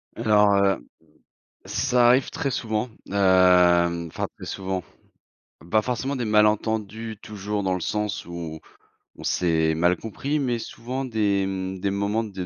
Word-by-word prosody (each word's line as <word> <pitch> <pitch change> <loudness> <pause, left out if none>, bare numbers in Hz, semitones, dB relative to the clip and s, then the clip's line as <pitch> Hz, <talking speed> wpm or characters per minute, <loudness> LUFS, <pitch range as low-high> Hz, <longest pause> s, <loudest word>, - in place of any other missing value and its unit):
Alors, 105 -3 +4
heu, 100 0 +4
hem, - - -10 0.8
ça 125 -2 +2
arrive 130 +2 +4
très 160 -4 -2
souvent, 110 0 -2 0.2
hem, 90 -3 +4
enfin 80 - -4
très - - -9
souvent. 95 -1 -3 0.9
Pas 110 0 +3
forcément 125 +4 -2
des 125 - -2
malentendus 110 +1 +1
toujours 105 0 -4
dans 95 -1 +1
le 90 - -3
sens 105 +2 -2
où 85 -2 -6 0.6
on - - -10
s'est 80 -2 +1
mal 90 +3 +3
compris, 140 +7 -3
mais 125 -4 0
souvent 125 +4 -5
des, 105 -5 +1
mmh, 95 0 -4
des 100 +1 -1
moments 100 +3 0
de 95 -4 -6
105 Hz, 150 wpm, -24 LUFS, 95-115 Hz, 0.9 s, Alors